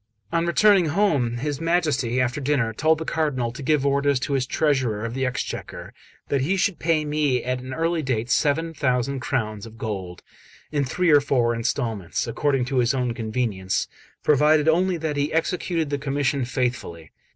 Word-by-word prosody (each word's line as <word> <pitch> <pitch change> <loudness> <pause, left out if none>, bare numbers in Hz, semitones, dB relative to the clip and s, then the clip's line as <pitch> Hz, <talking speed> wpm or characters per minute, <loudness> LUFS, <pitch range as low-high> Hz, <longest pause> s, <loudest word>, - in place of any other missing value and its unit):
On 165 0 +1
returning 195 0 +4
home, 145 - +1
his 145 +3 -3
Majesty, 150 -8 +1
after 125 +3 0
dinner, 130 -5 0
told 155 +7 +2
the 160 - -5
Cardinal 135 -8 -1
to 125 - -9
give 140 0 +1
orders 140 -1 +2
to 145 - -2
his 130 -2 0
treasurer 130 -9 0
of 115 - -4
the 135 0 -1
Exchequer 125 - -5 0.4
that 140 -2 +1
he 180 +9 +1
should 190 -1 0
pay 160 -2 +1
me 150 -4 0
at 125 0 -2
an 130 +1 -8
early 165 +3 0
date 125 -4 -2
seven 165 +5 +1
thousand 130 -2 0
crowns 115 -6 -3
of 115 0 -14
gold, 95 -6 -5 0.5
in 145 -2 +1
three 175 +6 +1
or 145 -1 +7
four 125 -4 +1
instalments, 115 - -2
according 135 -4 0
to 130 +1 -2
his 125 +2 +2
own 125 -2 -1
convenience, 110 -5 -2 0.4
provided 150 +1 +4
only 180 +3 +3
that 155 -2 -3
he 145 +1 0
executed 165 -1 -1
the 145 - -1
commission 140 -2 0
faithfully. 120 - -3
140 Hz, 175 wpm, -23 LUFS, 120-155 Hz, 0.5 s, or